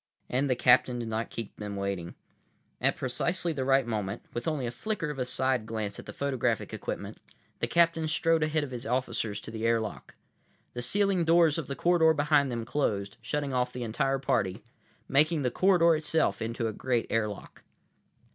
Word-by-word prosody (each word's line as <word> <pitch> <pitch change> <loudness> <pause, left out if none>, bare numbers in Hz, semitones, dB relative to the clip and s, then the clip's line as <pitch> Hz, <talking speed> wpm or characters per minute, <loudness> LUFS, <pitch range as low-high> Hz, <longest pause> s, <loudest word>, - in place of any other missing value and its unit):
And 135 +3 +1
the 125 - +3
captain 125 0 +4
did 115 -2 -4
not 110 +1 -2
keep 115 -3 -7
them 105 -1 -5
waiting. 100 -3 -3 0.7
At - - +3
precisely 165 +6 -1
the 135 -3 -2
right 135 0 +3
moment, 105 -4 -3
with 120 - -4
only 150 -5 -1
a 120 - -2
flicker 190 - -3
of 140 - -7
a 125 - 0
side 125 -2 0
glance 110 -3 -4
at - - -10
the - - -5
photographic 125 -5 -1
equipment, - - -5 0.4
the - - 0
captain 170 -2 +3
strode 165 +1 +2
ahead 155 0 +1
of 140 - -6
his 120 -2 -6
officers 115 -4 -1
to 110 - -9
the 110 0 -5
airlock. 115 -2 -1 0.6
The 120 - -4
sealing 195 +6 +1
doors 165 -1 +4
of 155 - -5
the 140 - -4
corridor 165 -1 +4
behind 145 -2 +3
them 115 -1 -3
closed, 100 -7 -1
shutting 140 +4 -2
off 125 0 0
the 125 0 -5
entire 125 +4 0
party, 120 -7 -1 0.4
making 150 +2 +3
the 125 - +1
corridor 170 0 +4
itself 155 +1 0
into 115 +1 -2
a 110 - -3
great 120 +1 0
airlock. 105 -2 -3
130 Hz, 185 wpm, -29 LUFS, 115-155 Hz, 0.7 s, captain